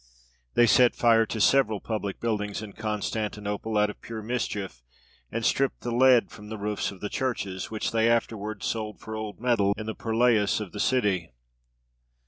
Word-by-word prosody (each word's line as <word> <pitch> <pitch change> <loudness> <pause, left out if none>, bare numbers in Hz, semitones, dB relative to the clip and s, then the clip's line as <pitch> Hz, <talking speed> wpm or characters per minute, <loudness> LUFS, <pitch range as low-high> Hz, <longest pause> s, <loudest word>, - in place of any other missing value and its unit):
They 120 - +6
set 120 +2 +5
fire 115 -2 +4
to 110 - -4
several 110 -2 +3
public 105 -3 -4
buildings 105 -2 -2
in 105 -2 -9
Constantinople 105 0 -3
out 105 0 +3
of - - -17
pure 110 -2 -7
mischief, 105 - -3 0.5
and 115 - -2
stripped 135 -1 +1
the 120 - -3
lead 125 -3 +5
from 105 0 -11
the 110 - -5
roofs 105 0 -2
of 95 -2 -11
the 105 - -2
churches, 100 -8 -3
which 110 -1 -2
they 115 0 +3
afterwards 110 -3 -1
sold 110 -2 -3
for 110 - -7
old 110 -1 -6
metal 110 -5 +2
in 110 - -5
the 110 - -3
purlieus 115 -3 +2
of 105 -4 -6
the 105 - -7
city. 100 -10 +1
110 Hz, 175 wpm, -27 LUFS, 105-115 Hz, 0.5 s, They